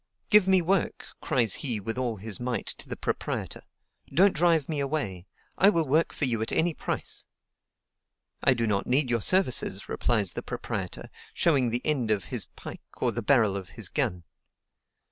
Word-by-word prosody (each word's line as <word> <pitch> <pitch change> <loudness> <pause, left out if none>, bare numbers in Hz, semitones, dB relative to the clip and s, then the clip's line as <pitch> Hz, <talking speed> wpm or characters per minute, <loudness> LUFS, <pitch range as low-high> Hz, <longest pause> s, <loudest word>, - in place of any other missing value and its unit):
"Give 210 -3 +6
me 190 -2 +4
work!" 190 +1 0 0.2
cries 115 -6 +3
he 120 -7 +1
with 115 +3 -4
all 125 -3 -1
his 105 0 -2
might 125 0 -2
to - - -7
the - - -5
proprietor: - - -3 0.5
"don't 190 +2 +4
drive 165 -3 +2
me 155 -3 -2
away, 135 - -3 0.3
I 195 - +7
will 165 -6 +1
work 155 +5 +2
for 150 - -2
you 115 -4 -1
at 110 - -2
any 170 +1 +1
price." - - -5 1.2
"I 135 - +4
do 115 -1 0
not 100 -3 -1
need 130 0 +2
your 115 -2 +1
services," 130 - +1
replies 105 -6 +1
the - - -5
proprietor, - - -5 0.2
showing 140 -7 +2
the 120 +2 -3
end 135 -7 0
of 105 -4 0
his - - 0
pike - - -11 0.2
or - - 0
the - - -4
barrel 115 -8 +3
of 95 -2 -6
his - - +1
gun. 90 -1 -2
125 Hz, 180 wpm, -27 LUFS, 110-160 Hz, 1.2 s, I